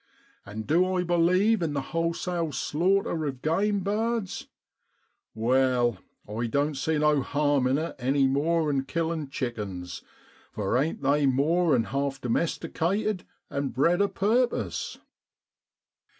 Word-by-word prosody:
And 110 +2 -6
du 185 +4 +2
I 180 - +1
believe 180 +5 +3
in 160 -3 -1
the 140 - -1
wholesale 165 0 -1
slaughter 170 +4 0
of 130 -2 -6
game 200 +6 +1
birds? 215 +1 -2 0.9
Wai, 125 0 +2 0.3
I 110 +3 -3
doan't 145 +4 0
see 160 +3 0
no 150 -1 +3
harm 145 -1 +1
in 130 +2 +2
it 160 +2 -3
any 135 +2 +2
more 155 +3 +1
'an 135 -1 0
killin' 160 -2 -2
chickens, 100 - -5 0.5
for 100 0 -1
ain't 140 +3 0
they 140 +1 +3
more 155 +5 +3
'an 115 - +2
half 135 +5 -2
domesticated, 180 - -1 0.2
and 140 -2 -3
bred 170 +8 +3
a 200 - +4
purpose 235 +6 0
150 Hz, 130 wpm, -27 LUFS, 135-175 Hz, 0.9 s, a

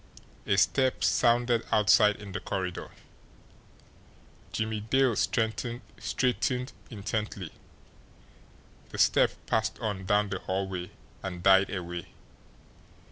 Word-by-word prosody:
A 100 - +2
step 130 +5 +2
sounded 120 -1 +3
outside 105 0 +5
in 100 -2 -10
the 105 - -3
corridor. 95 -2 -4 1.6
Jimmie 110 0 -2
Dale 125 +3 +2
straightened 125 +3 -1 0.2
intently. 105 -4 -4 1.4
The - - -8
step - - +4
passed 110 0 0
on 100 -5 -4
down 105 0 +2
the 95 -1 -3
hallway 95 -1 -3 0.3
and 90 -2 -6
died 95 0 +6
away. 85 -3 -5
105 Hz, 95 wpm, -28 LUFS, 95-115 Hz, 1.6 s, died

